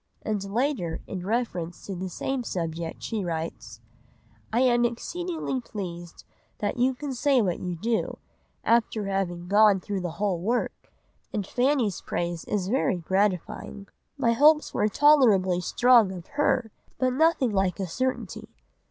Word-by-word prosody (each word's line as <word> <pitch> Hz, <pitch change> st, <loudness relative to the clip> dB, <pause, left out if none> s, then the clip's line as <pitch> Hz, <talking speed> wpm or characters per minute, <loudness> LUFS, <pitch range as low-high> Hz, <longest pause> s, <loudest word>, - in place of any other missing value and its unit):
And 210 Hz, -2 st, -2 dB
later, 225 Hz, -, -1 dB
in 185 Hz, -1 st, -6 dB
reference 200 Hz, -7 st, -2 dB
to 200 Hz, -, -5 dB
the 185 Hz, +1 st, -4 dB
same 265 Hz, +8 st, -3 dB
subject, 165 Hz, -4 st, -4 dB
she 220 Hz, -3 st, -2 dB
writes— 130 Hz, -, -5 dB, 0.7 s
"I 235 Hz, -, +2 dB
am 240 Hz, -2 st, +4 dB
exceedingly 315 Hz, +4 st, -2 dB
pleased 175 Hz, -7 st, -7 dB, 0.3 s
that 205 Hz, +2 st, -2 dB
you 255 Hz, +2 st, +2 dB
can 280 Hz, +1 st, -5 dB
say 270 Hz, +1 st, +3 dB
what 185 Hz, -6 st, 0 dB
you 180 Hz, -1 st, -3 dB
do, 225 Hz, +6 st, -1 dB, 0.5 s
after 225 Hz, -2 st, +2 dB
having 180 Hz, -3 st, -2 dB
gone 205 Hz, 0 st, +5 dB
through 195 Hz, +1 st, -4 dB
the 175 Hz, -2 st, -4 dB
whole 200 Hz, -4 st, 0 dB
work, 235 Hz, +6 st, -2 dB, 0.4 s
and 205 Hz, -2 st, -2 dB
Fanny's 245 Hz, -, +1 dB
praise 170 Hz, -1 st, -3 dB
is 195 Hz, -3 st, -1 dB
very 220 Hz, -4 st, +1 dB
gratifying. 190 Hz, +2 st, -2 dB, 0.3 s
My 235 Hz, -4 st, +2 dB
hopes 300 Hz, +5 st, +4 dB
were 210 Hz, -, +2 dB
tolerably 210 Hz, -10 st, +4 dB
strong 235 Hz, +1 st, +4 dB
of 180 Hz, -2 st, -8 dB
her, 255 Hz, -5 st, +1 dB, 0.3 s
but 255 Hz, -1 st, +1 dB
nothing 305 Hz, -4 st, +3 dB
like 190 Hz, -1 st, 0 dB
a 195 Hz, -, -1 dB
certainty. 255 Hz, +9 st, -3 dB
210 Hz, 145 wpm, -26 LUFS, 180-250 Hz, 0.7 s, gone